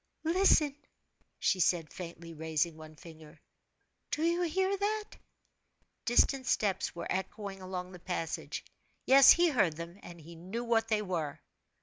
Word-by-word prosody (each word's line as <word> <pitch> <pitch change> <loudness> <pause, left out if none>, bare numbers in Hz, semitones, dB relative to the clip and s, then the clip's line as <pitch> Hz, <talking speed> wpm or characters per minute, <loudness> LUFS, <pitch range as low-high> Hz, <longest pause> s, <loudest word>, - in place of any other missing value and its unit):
"Listen!" 325 -4 +4 0.6
she 190 - +1
said, 170 -2 +1
faintly 170 -1 -8
raising 160 0 -1
one 155 0 -12
finger. 160 -1 -14 0.7
"Do 305 - -2
you 340 +1 +2
hear 380 +3 +1
that?" 420 +2 -1 1.0
Distant 260 +2 +3
steps 195 -7 0
were 170 - -5
echoing 195 +1 -4
along 185 -1 -5
the 180 - -11
passage. 170 -2 -4 0.4
Yes; 270 0 +8
he 345 0 +7
heard 195 - +2
them, 170 +4 -8
and 175 -1 -11 0.3
knew 230 +4 -3
what 225 -1 +1
they 215 -1 +1
were. 165 -7 -3
190 Hz, 135 wpm, -31 LUFS, 170-275 Hz, 1.0 s, Yes